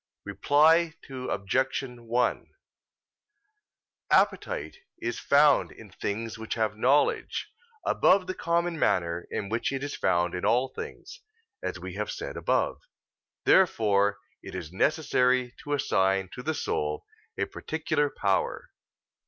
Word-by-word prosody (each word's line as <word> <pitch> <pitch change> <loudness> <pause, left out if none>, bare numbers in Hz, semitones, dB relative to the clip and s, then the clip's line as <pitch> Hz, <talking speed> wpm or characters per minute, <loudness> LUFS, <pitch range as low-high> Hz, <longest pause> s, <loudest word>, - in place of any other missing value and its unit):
Reply 160 +3 +3
Obj. 130 0 -1
1: 120 -1 -2 1.6
Appetite - - +1 0.2
is 120 0 -3
found 145 0 +4
in 105 -3 -14
things 110 +3 -4
which 110 - -4
have 110 -2 0
knowledge, 130 +6 +1 0.3
above 190 -1 +4
the 185 - -3
common 170 -1 -1
manner 85 -6 0
in 100 - -3
which 115 +4 -1
it 135 0 -3
is 145 - -4
found 85 0 +1
in 90 - -4
all 120 +5 +2
things, 485 - -9 0.4
as - - -3
we - - -7
have - - -2
said - - -5
above. - - 0 0.6
Therefore 105 - +4 0.2
it - - -9
is 85 -4 -6
necessary 125 -1 +2
to 145 - -3
assign 95 -8 +1
to - - -7
the 155 +4 -2
soul 75 - -2 0.3
a - - 0
particular 155 -2 -1
power. 100 -6 -1
125 Hz, 125 wpm, -27 LUFS, 100-150 Hz, 1.6 s, found